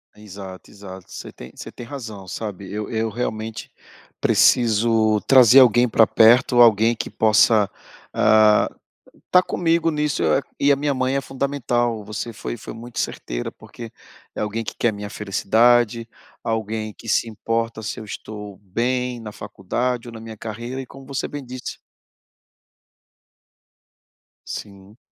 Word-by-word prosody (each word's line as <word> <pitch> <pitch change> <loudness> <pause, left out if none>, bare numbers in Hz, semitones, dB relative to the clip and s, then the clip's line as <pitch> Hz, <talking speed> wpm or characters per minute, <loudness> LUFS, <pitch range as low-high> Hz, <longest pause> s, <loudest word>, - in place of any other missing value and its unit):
Exato, 100 -3 -11
exato, 95 -2 -11
você - - -8
tem 60 - -12
você - - -9
tem 120 - -10
razão, 110 -8 -8
sabe, 100 -1 -6
eu 105 +1 -4
eu 110 -1 -1
realmente 110 -1 -5 0.5
preciso 110 -2 +3
trazer 130 -1 +8
alguém 120 -1 +5
pra 110 -1 +4
perto, 120 +2 +5
alguém 115 0 +5
que - - -5
possa, 110 -1 +4 0.4
ah, 110 -1 +4 0.6
tá 180 - +7
comigo 165 -2 +1
nisso, 150 -2 -1 0.4
e 145 - +4
a - - +5
minha 140 0 -1
mãe 130 +1 0
é 140 - 0
fundamental. 125 -5 -1
Você 105 +2 -5
foi 115 +2 -6
foi 110 - -9
muito 115 +1 -8
certeira, - - -4
porque 115 -2 -11 0.4
é - - -5
alguém 105 +2 -2
que - - -7
quer 120 - +2
a - - -1
minha 105 0 -7
felicidade, 115 +3 +2 0.4
alguém 110 -1 -3
que 115 - -10
se 115 - +2
importa 115 +1 -3
se 110 - -5
eu 110 - -8
estou 105 -1 -8
bem 125 +5 -2
na 110 -2 -8
faculdade 120 +6 -3
ou 120 - -9
na 115 - -9
minha 110 -1 -9
carreira, 120 +5 -6
e 130 - -5
como 135 +1 -14
você 140 -1 -3
bem 145 -1 -7
disse 125 0 -7 2.7
Sim. 100 +1 -9
115 Hz, 150 wpm, -22 LUFS, 105-125 Hz, 2.7 s, trazer